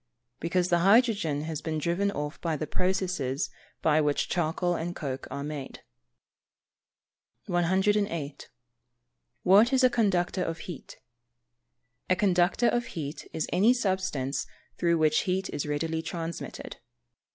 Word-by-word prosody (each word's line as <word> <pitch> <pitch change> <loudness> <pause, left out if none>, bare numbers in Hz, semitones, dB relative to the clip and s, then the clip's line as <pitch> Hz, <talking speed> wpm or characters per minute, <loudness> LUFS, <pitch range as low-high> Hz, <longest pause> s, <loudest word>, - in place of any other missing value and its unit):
_ - - -48
Because 175 +2 0
the 175 - +3
hydrogen 200 - +3
has 155 -1 -4
been 160 -1 -2
driven 170 +6 0
off 150 -5 -4
by 165 -3 -1
the 155 - -3
processes 165 -7 -1 0.3
by 155 -1 +4
which 145 -1 0
charcoal 175 +1 0
and 175 +1 -3
coke 135 -3 -4
are 140 - -4
made. 145 -2 -6 1.6
108. 175 -4 0 0.9
What 205 +7 +6
is 265 -1 +3
a 255 - +6
conductor 190 -5 +1
of 165 0 -3
heat? 175 -6 -9 1.1
A 185 - +4
conductor 185 +4 +3
of 240 0 0
heat 150 -1 -5
is 160 - -2
any 205 +7 +5
substance 185 - -1 0.3
through 170 -1 +3
which 155 -1 +3
heat 190 +1 -1
is 145 - -3
readily 160 +2 -1
transmitted. 165 0 -6
170 Hz, 130 wpm, -28 LUFS, 155-190 Hz, 1.6 s, What